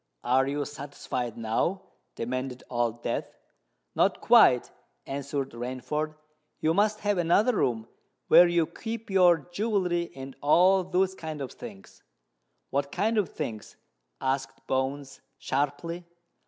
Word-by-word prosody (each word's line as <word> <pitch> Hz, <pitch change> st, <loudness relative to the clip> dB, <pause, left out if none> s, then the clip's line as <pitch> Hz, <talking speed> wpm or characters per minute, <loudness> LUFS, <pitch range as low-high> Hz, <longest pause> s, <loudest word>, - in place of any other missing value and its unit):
"Are 130 Hz, +2 st, +3 dB
you 145 Hz, +1 st, -1 dB
satisfied 135 Hz, -4 st, -5 dB
now?" 115 Hz, -, -1 dB, 0.3 s
demanded 130 Hz, +1 st, -4 dB
Old 120 Hz, -1 st, -1 dB
Death. -, -, -3 dB, 0.6 s
"Not -, -, +2 dB
quite," -, -, +5 dB, 0.3 s
answered 140 Hz, 0 st, -3 dB
Rainford. 130 Hz, +6 st, -3 dB, 0.4 s
"You 160 Hz, -, +2 dB
must 210 Hz, +3 st, +2 dB
have 205 Hz, -2 st, +1 dB
another 200 Hz, +8 st, +3 dB
room 115 Hz, -2 st, 0 dB, 0.4 s
where 175 Hz, -, +8 dB
you 175 Hz, -1 st, +2 dB
keep 225 Hz, +4 st, -7 dB
your 180 Hz, -3 st, +6 dB
jewellery 180 Hz, -4 st, 0 dB
and 135 Hz, 0 st, -8 dB
all 185 Hz, +6 st, +5 dB
those 185 Hz, +1 st, +1 dB
kinds 155 Hz, -5 st, -6 dB
of 130 Hz, -, -6 dB
things?" 95 Hz, 0 st, -12 dB, 0.7 s
"What 140 Hz, 0 st, -1 dB
kind 215 Hz, +4 st, +1 dB
of 200 Hz, -, 0 dB
things?" 115 Hz, -9 st, -6 dB, 0.4 s
asked 135 Hz, +1 st, -2 dB
Bones 135 Hz, +1 st, -2 dB, 0.2 s
sharply. 145 Hz, +7 st, -2 dB
145 Hz, 125 wpm, -28 LUFS, 130-180 Hz, 0.7 s, where